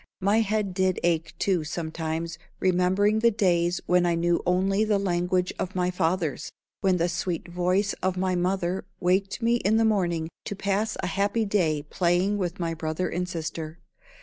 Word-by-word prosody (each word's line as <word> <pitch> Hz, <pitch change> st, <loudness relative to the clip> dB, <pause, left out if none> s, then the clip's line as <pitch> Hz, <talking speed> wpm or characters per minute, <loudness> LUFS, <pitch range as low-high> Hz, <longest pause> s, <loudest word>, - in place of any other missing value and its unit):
My 200 Hz, +3 st, +3 dB
head 210 Hz, -3 st, 0 dB
did 185 Hz, -1 st, +1 dB
ache, 165 Hz, -1 st, 0 dB
too, 185 Hz, -5 st, +1 dB
sometimes, 160 Hz, +1 st, -4 dB, 0.2 s
remembering 190 Hz, +4 st, +2 dB
the 235 Hz, +1 st, +5 dB
days 175 Hz, -4 st, +1 dB
when 180 Hz, 0 st, +3 dB
I 170 Hz, -, +2 dB
knew 170 Hz, +1 st, +1 dB
only 190 Hz, +3 st, +2 dB
the 215 Hz, -2 st, +2 dB
language 180 Hz, -1 st, 0 dB
of 185 Hz, +1 st, -3 dB
my 180 Hz, 0 st, +1 dB
fathers, 170 Hz, -3 st, -1 dB, 0.3 s
when 190 Hz, -3 st, +2 dB
the 170 Hz, 0 st, +1 dB
sweet 180 Hz, -1 st, -3 dB
voice 180 Hz, +3 st, +1 dB
of 185 Hz, 0 st, 0 dB
my 185 Hz, 0 st, 0 dB
mother 180 Hz, 0 st, 0 dB, 0.2 s
waked 195 Hz, +5 st, 0 dB
me 235 Hz, +1 st, +3 dB
in 220 Hz, -1 st, +2 dB
the 225 Hz, -, +3 dB
morning 175 Hz, -7 st, +1 dB, 0.2 s
to 205 Hz, -, -4 dB
pass 200 Hz, +3 st, -1 dB
a -, -, +1 dB
happy 200 Hz, +4 st, 0 dB
day 165 Hz, -8 st, +1 dB
playing 180 Hz, +5 st, +1 dB
with 175 Hz, -2 st, -3 dB
my 165 Hz, -1 st, -1 dB
brother 160 Hz, +2 st, -2 dB
and 180 Hz, +1 st, -2 dB
sister. 160 Hz, -1 st, -5 dB
180 Hz, 175 wpm, -26 LUFS, 170-195 Hz, 0.3 s, the